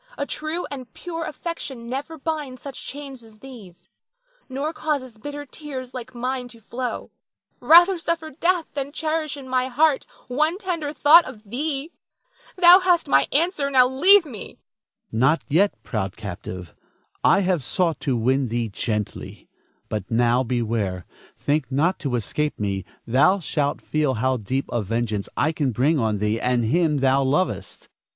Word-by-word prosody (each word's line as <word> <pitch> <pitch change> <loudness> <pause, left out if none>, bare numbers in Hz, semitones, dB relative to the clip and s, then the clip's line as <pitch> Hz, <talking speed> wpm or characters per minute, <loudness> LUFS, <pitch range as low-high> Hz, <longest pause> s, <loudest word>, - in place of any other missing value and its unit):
A - - -2
true 310 +4 -3
and 255 -5 -7
pure 330 -2 -5
affection 275 -8 -6
never 275 +6 -5
binds 295 -4 -4
such 275 -2 -8
chains 275 -2 -8
as 220 -2 -17
these, 215 -8 -13 0.6
nor 280 +5 -3
causes 265 -8 -3
bitter 290 +4 -6
tears 260 -3 -8
like 250 0 -8
mine 250 +1 -3
to 235 -1 -14
flow. 240 +3 -5 0.5
Rather 350 +3 +6
suffer 330 -1 -2
death 340 +3 +1
than 280 0 -3
cherish 310 -1 -2
in 270 -2 -10
my 255 0 +1
heart 285 +2 +2 0.2
one 305 +7 +1
tender 345 -7 -3
thought 310 +3 +7
of 225 -5 -10
thee. 275 - -3 0.6
Thou 360 0 +8
hast 360 -2 +2
my 135 0 +4
answer, 300 -1 +1
now 255 -2 +5
leave 345 +9 +6
me. 240 -8 -8
Don - - -7
Felix. - - -19 0.5
Not 130 +8 +2
yet, 190 +7 +2
proud 105 -4 -3
captive. 90 -3 -7 0.5
I 195 - +5
have 180 -4 +1
sought 165 +5 -1
to 130 -4 -1
win 130 +3 +1
thee 115 0 -2
gently; 105 0 -4 0.4
but 105 -3 -4
now, 120 +2 +3
beware. 115 -7 -2 0.3
Think 150 0 -1
not 160 +8 +1
to 135 -6 -2
escape 150 +6 -2
me, 100 -2 -2 0.2
thou 150 - +4
shalt 150 -5 -2
feel 150 -4 0
how 130 +3 +1
deep 130 +5 -2
a 120 - 0
vengeance 110 -1 -2
I 155 - +2
can 150 -4 -1
bring 140 +7 +2
on 110 -3 0
thee 105 +2 -1
and 125 -2 +1
him 150 +2 +1
thou 135 +1 +3
lovest. 150 +8 -1
230 Hz, 160 wpm, -23 LUFS, -, 0.6 s, Thou